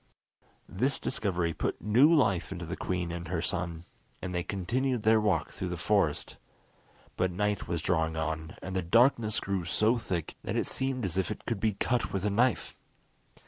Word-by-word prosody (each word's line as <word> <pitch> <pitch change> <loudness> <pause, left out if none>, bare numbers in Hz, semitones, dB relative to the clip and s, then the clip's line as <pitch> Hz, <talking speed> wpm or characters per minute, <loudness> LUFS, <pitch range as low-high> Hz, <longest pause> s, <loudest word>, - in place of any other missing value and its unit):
This 130 +8 0
discovery 90 -9 -1
put - - -2
new 125 +9 +5
life 100 - +3
into 90 -2 -5
the 85 +3 -4
queen 90 -3 -2
and 85 0 -5
her 85 0 -1
son, 85 -1 -3 0.3
and 90 - -5
they 90 - 0
continued 115 +7 -1
their 110 0 +5
walk 105 -2 +1
through - - -4
the - - -3
forest. - - 0 0.8
But 95 0 +2
night 105 +2 -1
was 85 -2 -2
drawing 80 -3 +1
on, 80 0 -3
and 95 0 -5
the 95 - +1
darkness 115 +3 +3
grew 100 -2 -2
so 110 +7 +2
thick 90 -8 -3
that - - -3
it - - +1
seemed 130 -3 -1
as 95 0 0
if 95 - 0
it - - -6
could 115 -4 -2
be 110 +1 +1
cut 120 +4 0
with 95 0 -2
a 105 - +1
knife. 120 +4 +1
95 Hz, 185 wpm, -30 LUFS, 85-110 Hz, 0.8 s, new